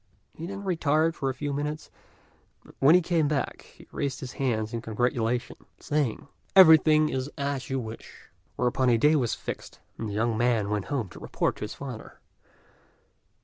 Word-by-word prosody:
He 165 - -7
then 200 +1 -6
retired 160 -3 +1
for 135 - -2
a - - -2
few 145 +1 -3
minutes, 150 +2 -4 0.7
and - - -17
when 145 +5 +6
he 180 - +4
came 165 -3 +1
back 145 -3 -2
he - - -16
raised 140 -2 -3
his 130 - -7
hands 110 -5 -2
in 115 - -3
congratulation, 120 +1 -1 0.2
saying, 145 -5 -1 0.3
"Everything 155 -4 +7
is 130 +1 -3
as 140 -2 -3
you 135 0 -1
wish;" 110 -2 -10 0.2
whereupon 125 +1 +1
a 120 - +4
day 150 +7 +4
was 125 -6 +1
fixed, - - -7 0.2
and 110 - -3
the - - -5
young 115 +2 0
man 115 -3 +1
went 105 -2 -1
home 135 -8 -2
to - - -12
report - - -2
to - - -4
his 105 - -8
father. 125 -5 -9
135 Hz, 180 wpm, -27 LUFS, 115-150 Hz, 0.7 s, Everything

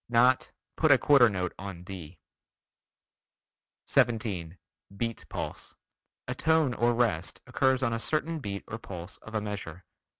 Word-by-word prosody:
Not 125 +2 +4 0.3
"put 160 - +3
a 140 - +8
quarter 135 -4 +6
note 90 -3 -2
on 95 -2 -7
D." 90 -3 -9 1.7
17. 100 -8 +1 0.4
Beat 115 +1 -3
Pulse: - - -6 0.5
A - - -1
tone 160 -5 +2
or 120 0 +2
rest 110 -8 0
occurs 130 0 +2
on 115 -2 +1
a 115 - -1
certain 155 +5 -1
beat 100 -6 -5
or 115 - -5
pulse 90 -4 -8
of 110 - -11
a 110 - +1
measure. 100 -5 -6
115 Hz, 140 wpm, -29 LUFS, 95-130 Hz, 1.7 s, a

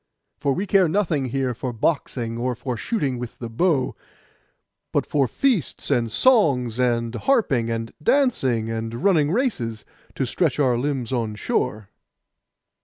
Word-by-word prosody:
For 140 - +1
we 190 +8 -2
care 195 -3 +4
nothing 165 -7 +1
here 130 0 -1
for 125 +2 -4
boxing, 120 -2 -1
or 125 +1 -1
for 125 +1 -4
shooting 135 - -2
with 120 -1 -7
the 115 -2 -7
bow; 140 0 +1 1.0
but - - +1
for 140 -3 +1
feasts, 225 - 0
and 115 -2 +1
songs, 135 - +3
and 120 -2 +1
harping, 135 - +1
and 115 0 -3
dancing, 140 - +2
and 115 +4 -4
running 165 -7 +4
races, 155 - -1 0.3
to 135 - 0
stretch 150 +2 0
our 130 -4 +3
limbs 130 -1 -2
on 115 -4 -1
shore. 100 0 -2
130 Hz, 145 wpm, -23 LUFS, 115-165 Hz, 1.0 s, care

